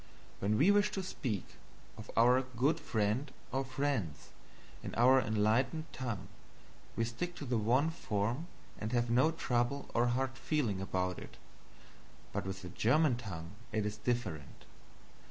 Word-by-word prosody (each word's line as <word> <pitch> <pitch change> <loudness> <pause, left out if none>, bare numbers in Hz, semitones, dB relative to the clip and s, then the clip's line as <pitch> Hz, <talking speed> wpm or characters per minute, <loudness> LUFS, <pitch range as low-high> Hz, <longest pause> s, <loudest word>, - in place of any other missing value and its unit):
When 105 +2 +1
we 165 - +6
wish 205 +1 +4
to 195 - -2
speak 120 - -3 0.5
of 110 - -10
our 125 +3 +6
"good 130 +5 0
friend 110 +5 0 0.2
or 135 +1 0
friends," 130 - -2 0.5
in - - -6
our 130 +3 +6
enlightened 115 +9 +1
tongue, 120 -7 -4 0.7
we 115 - +1
stick 145 +10 -4
to 145 - -6
the 120 -3 +1
one 130 +9 +3
form 120 +1 -2 0.3
and 110 +3 -3
have 120 -1 +1
no 130 +6 +5
trouble 135 -3 -1
or 120 +1 +3
hard 130 +2 -1
feeling 120 -12 0
about 90 -2 -1
it; - - -11 1.0
but - - -2
with 95 0 -5
the 90 - -6
German 125 - +3
tongue 90 -8 -6 0.2
it 110 -2 0
is 105 0 -3
different. 110 - -3
120 Hz, 150 wpm, -34 LUFS, 105-135 Hz, 1.0 s, we